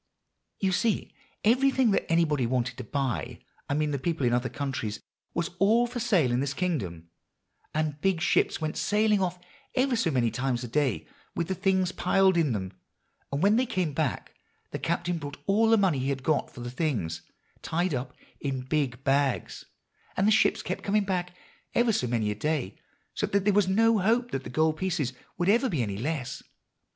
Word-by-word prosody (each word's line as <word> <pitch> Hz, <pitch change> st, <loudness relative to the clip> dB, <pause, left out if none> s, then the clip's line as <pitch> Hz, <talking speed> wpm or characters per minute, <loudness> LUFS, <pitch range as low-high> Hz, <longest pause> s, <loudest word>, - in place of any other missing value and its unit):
"You 190 Hz, -1 st, +1 dB
see, 210 Hz, +4 st, 0 dB, 0.3 s
everything 255 Hz, +1 st, +4 dB
that 195 Hz, -, 0 dB
anybody 150 Hz, -7 st, +2 dB
wanted 125 Hz, 0 st, -1 dB
to 130 Hz, -, -5 dB
buy 135 Hz, +2 st, -2 dB, 0.3 s
I 140 Hz, -, +1 dB
mean 150 Hz, 0 st, 0 dB
the 140 Hz, -, -1 dB
people 160 Hz, -2 st, -1 dB
in 120 Hz, -, +2 dB
other 125 Hz, +1 st, +1 dB
countries 130 Hz, -7 st, -3 dB, 0.4 s
was 170 Hz, 0 st, -1 dB
all 220 Hz, +5 st, +4 dB
for 240 Hz, 0 st, -5 dB
sale 175 Hz, -, +2 dB
in 120 Hz, -, +1 dB
this 140 Hz, +1 st, -2 dB
kingdom; 95 Hz, -, -3 dB, 0.6 s
and 150 Hz, -1 st, -2 dB
big 190 Hz, -2 st, +2 dB
ships -, -, +2 dB
went 155 Hz, 0 st, -3 dB
sailing 210 Hz, -1 st, +2 dB
off 180 Hz, -1 st, -1 dB, 0.4 s
ever 260 Hz, -1 st, +2 dB
so 205 Hz, -7 st, +1 dB
many 125 Hz, -6 st, +1 dB
times 125 Hz, +1 st, -1 dB
a -, -, -4 dB
day 125 Hz, -, 0 dB, 0.3 s
with 170 Hz, 0 st, -2 dB
the -, -, +1 dB
things 190 Hz, -1 st, +1 dB
piled 190 Hz, +1 st, +3 dB
in 165 Hz, -5 st, +2 dB
them; 95 Hz, -3 st, -3 dB, 0.6 s
and 140 Hz, +4 st, -1 dB
when 205 Hz, +3 st, +5 dB
they 255 Hz, +1 st, +2 dB
came 180 Hz, -, -1 dB
back 145 Hz, -3 st, -2 dB, 0.4 s
the -, -, -4 dB
captain 175 Hz, 0 st, -1 dB
brought 145 Hz, -2 st, -7 dB
all 220 Hz, +3 st, +3 dB
the 225 Hz, -, +6 dB
money 185 Hz, -9 st, +2 dB
he 135 Hz, +2 st, 0 dB
got 135 Hz, +3 st, 0 dB
for 125 Hz, -, -10 dB
the 120 Hz, 0 st, -5 dB
things, 115 Hz, -, -2 dB, 0.4 s
tied 175 Hz, +1 st, -1 dB
up 130 Hz, 0 st, -4 dB, 0.2 s
in 135 Hz, -2 st, -2 dB
big 135 Hz, -2 st, -1 dB
bags; 135 Hz, -1 st, 0 dB, 0.5 s
and 195 Hz, -, +3 dB
the -, -, +5 dB
ships 215 Hz, -, +3 dB
kept -, -, -3 dB
coming 210 Hz, +1 st, +2 dB
back, 180 Hz, -2 st, -2 dB, 0.4 s
ever 240 Hz, -2 st, +3 dB
so 125 Hz, -, 0 dB
many 115 Hz, -3 st, 0 dB
a -, -, 0 dB
day, 140 Hz, -4 st, -2 dB, 0.4 s
so -, -, -1 dB
that 200 Hz, -1 st, 0 dB
there 205 Hz, -, +4 dB
was 205 Hz, -2 st, +3 dB
no 225 Hz, +3 st, +4 dB
hope 235 Hz, +5 st, +1 dB
that 135 Hz, -, -3 dB
the -, -, -7 dB
gold 155 Hz, +4 st, +1 dB
pieces 165 Hz, -9 st, -1 dB, 0.2 s
would 175 Hz, 0 st, 0 dB
ever 235 Hz, +6 st, +4 dB
be 150 Hz, -9 st, 0 dB
any 100 Hz, -3 st, -3 dB
less. 140 Hz, -1 st, -3 dB
155 Hz, 195 wpm, -28 LUFS, 130-195 Hz, 0.6 s, the